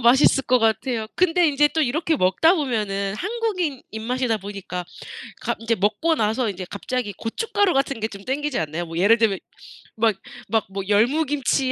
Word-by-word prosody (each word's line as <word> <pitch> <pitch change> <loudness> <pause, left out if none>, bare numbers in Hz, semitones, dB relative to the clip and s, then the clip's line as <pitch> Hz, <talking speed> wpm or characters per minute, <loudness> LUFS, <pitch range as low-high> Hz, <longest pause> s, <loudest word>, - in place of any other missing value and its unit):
맛있을 265 +3 +5
것 255 0 +3
같아요. 225 0 0
근데 355 -1 +3
인제 295 0 +4
또 320 - -1
이렇게 310 +4 0
먹다 270 - +4
보면은 210 - -1
한국인 390 - -2
입맛이다 230 +1 -1
보니까. 195 -2 -6 0.6
갑 - - -2
인제 230 0 0
먹고 220 - +1
나서 225 0 0
인제 185 -1 -7
갑자기 210 0 -3
고춧가루 395 - 0
같은 275 -2 0
게 220 - -1
좀 200 -1 -10
땡기지 285 +1 -1
않나요? 160 +2 -3
뭐 165 0 -7
예를 210 +6 +5
들면 215 -4 +1 0.6
막 220 -2 +3 0.3
막 225 -1 +1
뭐 195 0 -4
열무김치 270 +4 +2
235 Hz, 350 characters per minute, -23 LUFS, 205-295 Hz, 0.6 s, 맛있을